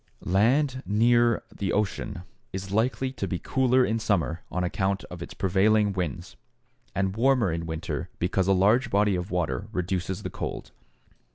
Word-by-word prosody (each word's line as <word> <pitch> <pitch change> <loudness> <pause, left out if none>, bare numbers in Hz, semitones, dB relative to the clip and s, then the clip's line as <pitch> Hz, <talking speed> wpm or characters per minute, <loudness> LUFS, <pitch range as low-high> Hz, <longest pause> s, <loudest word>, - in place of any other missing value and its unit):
Land 130 +8 +2
near 120 +2 +3
the 95 -3 -2
ocean 105 -2 -2 0.3
is 95 +1 -5
likely 125 +5 +1
to 135 - -4
be 90 - -2
cooler 130 +4 +2
in 115 +1 0
summer 90 -6 0
on 90 - -1
account 95 +3 -1
of 90 -1 -8
its - - -8
prevailing 100 +2 +3
winds, 90 -7 -4 0.6
and 95 0 0
warmer 125 -4 +3
in 85 0 -3
winter 80 -3 -4
because 95 +1 0
a - - +4
large 105 +7 +3
body 100 0 +3
of 90 +2 -3
water 90 +2 -1
reduces 90 -1 -2
the - - -4
cold. - - -5
100 Hz, 160 wpm, -26 LUFS, 90-115 Hz, 0.6 s, a